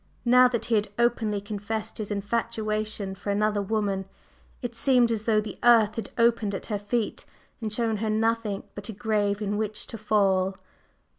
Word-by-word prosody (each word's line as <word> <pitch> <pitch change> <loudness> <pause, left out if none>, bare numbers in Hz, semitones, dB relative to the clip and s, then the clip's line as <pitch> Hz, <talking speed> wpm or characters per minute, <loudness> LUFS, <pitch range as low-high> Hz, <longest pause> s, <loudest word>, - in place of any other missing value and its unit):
Now 250 +1 +7
that 240 -2 -2
he 235 - -1
had 210 -1 +2
openly 230 -3 +1
confessed 210 +2 -4
his 215 - -4
infatuation 215 -1 -2
for 195 +1 -7
another 210 0 +1
woman, 200 -2 -1 0.6
it 240 -1 -3
seemed 240 0 +3
as 220 -1 -2
though 220 -2 +3
the 215 0 -6
earth 230 -3 +6
had 225 -3 -5
opened 230 -3 +2
at - - -5
her 205 - 0
feet 210 +2 -2 0.4
and 220 -1 -3
shown 225 0 +1
her 220 +1 -2
nothing 220 -1 0
but 205 +2 -8
a - - -4
grave 210 -1 0
in 205 0 -1
which 215 0 -2
to 225 - -8
fall. 195 -3 +2
215 Hz, 175 wpm, -26 LUFS, 205-230 Hz, 0.6 s, Now